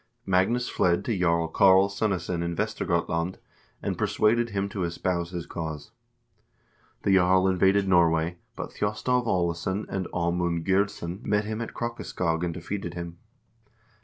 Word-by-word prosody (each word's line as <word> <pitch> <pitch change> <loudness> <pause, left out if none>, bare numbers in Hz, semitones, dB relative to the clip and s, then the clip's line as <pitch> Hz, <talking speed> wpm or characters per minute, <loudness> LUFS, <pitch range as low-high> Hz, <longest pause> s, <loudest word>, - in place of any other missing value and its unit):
Magnus 100 +7 +2
fled 85 -1 +1
to 115 - 0
Jarl 85 -2 +2
Karl 95 +3 +5
Sunnesson 95 -4 -1
in 85 0 -2
Vestergotland, 85 +1 -1 0.5
and - - -2
persuaded 120 +2 +2
him 100 -1 -1
to 95 -2 -3
espouse 85 0 -1
his 85 -2 -5
cause. 80 -3 -6 1.1
The 100 - +3
jarl 95 0 +4
invaded 95 +1 +3
Norway, 85 -2 +3 0.2
but - - -6
Thjostolv 120 +4 0
Aalesson 90 +2 0
and 95 -2 -2
Aamunde 85 -1 -1
Gyrdsson 95 0 0
met 105 0 +1
him 110 +1 -3
at 115 - -6
Krokaskog 90 -8 -2
and 85 - 0
defeated 85 +1 -5
him. 85 -1 -7
90 Hz, 135 wpm, -26 LUFS, 85-100 Hz, 1.1 s, Karl